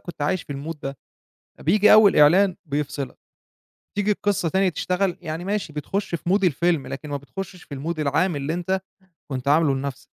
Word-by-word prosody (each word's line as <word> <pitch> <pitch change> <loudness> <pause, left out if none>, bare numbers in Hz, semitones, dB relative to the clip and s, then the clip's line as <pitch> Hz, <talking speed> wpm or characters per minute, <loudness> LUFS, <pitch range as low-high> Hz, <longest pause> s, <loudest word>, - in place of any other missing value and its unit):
كنت 160 -4 -8
عايش 165 +4 0
في - - -7
الmood 150 +4 -5
ده، 135 0 -4 0.6
فبييجي 205 +6 +5
أول 215 -2 +7
إعلان 180 +5 +5
بيفصلك، 145 -2 -3 0.8
تيجي 205 0 +1
القِصّة 200 -4 0
تانية 190 +3 +2
تشتغل، 180 +1 -1
يعني 165 0 -5
ماشي 200 -5 -2
بتخُش 185 +6 -3
في 170 +1 -3
mood 195 0 +3
الفيلم 170 -2 +1
لكن 145 +3 -6
ما 145 - -1
بتخشّش 180 +5 -8
في 140 - -9
الmood 155 +4 -4
العام 155 +3 +1
اللي 140 +4 -2
أنت 190 +2 -1 0.5
كنت 130 +1 -3
عامله 150 -2 +4
لنَفْس 135 0 -5
165 Hz, 175 wpm, -23 LUFS, 145-190 Hz, 0.8 s, أول